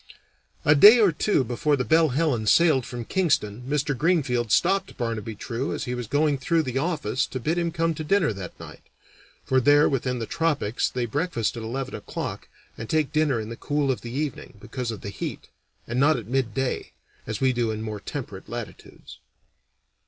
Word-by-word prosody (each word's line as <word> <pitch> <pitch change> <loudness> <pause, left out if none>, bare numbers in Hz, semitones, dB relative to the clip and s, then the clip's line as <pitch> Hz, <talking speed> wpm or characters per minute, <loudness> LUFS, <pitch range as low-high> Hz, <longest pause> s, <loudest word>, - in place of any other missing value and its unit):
A 150 - +7
day 210 +11 +9
or 205 -5 +5
two 165 -1 +1
before 145 +5 0
the 125 -2 -2
Belle 160 +5 +4
Helen 130 -6 0
sailed 145 0 +4
from 120 -2 -6
Kingston 125 - 0
Mr. 145 -1 0
Greenfield 130 - +1
stopped 195 +2 +2
Barnaby 115 -2 -3
True 120 +5 -3
as - - -4
he 125 - -3
was 120 -2 -4
going 145 +2 +1
through 165 +4 +1
the 130 -1 -2
office 145 -7 -1
to 130 - -5
bid 160 +7 0
him 170 -1 0
to 165 - -17
come 165 0 +2
to 155 - -5
dinner 170 - +2
that 95 -3 -8
night - - -11 0.6
(for 130 - +3
there 145 +3 +5
within 125 -2 -1
the 115 - -3
tropics 145 -7 0
they 125 -1 -2
breakfast 130 - -1
at 115 - -5
eleven 130 +4 -4
o'clock - - -5 0.3
and 115 - -6
take 155 -2 0
dinner 155 -6 +2
in 110 0 -5
the 115 - -6
cool 145 +2 0
of 130 - -3
the 120 - -7
evening, 145 -7 -4
because 120 +3 -5
of 110 -4 -5
the 100 - -6
heat, - - -6 0.4
and 120 +2 -2
not 150 +1 +4
at 115 - -6
midday, 130 +1 -2 0.3
as 110 -1 -3
we 130 -1 +2
do 120 -2 0
in 110 0 -3
more 110 -1 -5
temperate 105 -5 -7
latitudes). 120 -1 -9
130 Hz, 195 wpm, -25 LUFS, 115-155 Hz, 0.6 s, day